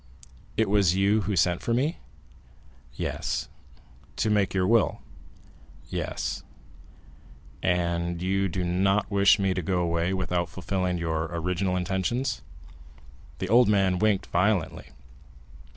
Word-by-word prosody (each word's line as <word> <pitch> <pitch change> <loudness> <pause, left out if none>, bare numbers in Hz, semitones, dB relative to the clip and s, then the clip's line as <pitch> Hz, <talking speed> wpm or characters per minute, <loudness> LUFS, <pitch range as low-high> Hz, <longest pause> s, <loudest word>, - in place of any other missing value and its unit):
"It 110 0 +2
was 100 -3 +3
you 100 +3 +3
who 100 - -1
sent 90 0 +2
for 115 - 0
me?" 145 +8 0 1.0
"Yes." - - -3 0.7
"To 110 - 0
make 100 -3 +2
your 95 -1 +1
will?" 115 +2 +2 0.9
"Yes." - - -3 1.2
"And 85 -1 0
you 95 +2 0
do 90 +1 -2
not 95 +4 +1
wish 100 +1 +5
me 95 -2 +1
to 90 - -2
go 90 +1 0
away 85 +1 0
without 90 -2 -1
fulfilling 90 +1 -2
your 80 -1 -1
original 90 +3 -2
intentions?" 95 +8 -1 1.0
The 95 - -3
old 120 +1 +5
man 95 -3 +2
winked 105 -2 +2
violently. 90 -4 0
95 Hz, 120 wpm, -26 LUFS, 85-100 Hz, 1.2 s, wish